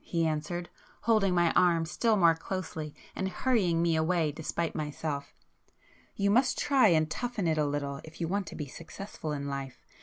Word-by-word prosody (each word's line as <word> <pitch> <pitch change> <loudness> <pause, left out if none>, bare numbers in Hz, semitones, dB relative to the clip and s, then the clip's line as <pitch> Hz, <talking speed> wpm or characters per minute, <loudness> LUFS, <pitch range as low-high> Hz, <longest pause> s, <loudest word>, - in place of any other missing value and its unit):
he 165 -1 0
answered, 160 +3 -2 0.3
holding 210 -4 +3
my 175 -1 +4
arm 170 -2 +4
still 220 +6 +1
more 170 -3 +6
closely 160 -3 -5 0.2
and 190 - -1
hurrying 185 -7 +1
me 170 -1 +2
away 160 -1 +2
despite 160 +2 -3
myself—"You 150 +6 -5
must 250 +5 +3
try 270 -5 +4
and 160 -4 +4
toughen 235 +3 -3
it 160 -1 +1
a 150 - +2
little 140 -1 -3
if 160 0 -12
you 165 - -1
want 195 +1 -1
to - - -7
be 150 - -4
successful 160 +2 -7
in 140 -1 -3
life. 135 -2 -6
165 Hz, 175 wpm, -30 LUFS, 155-190 Hz, 0.3 s, more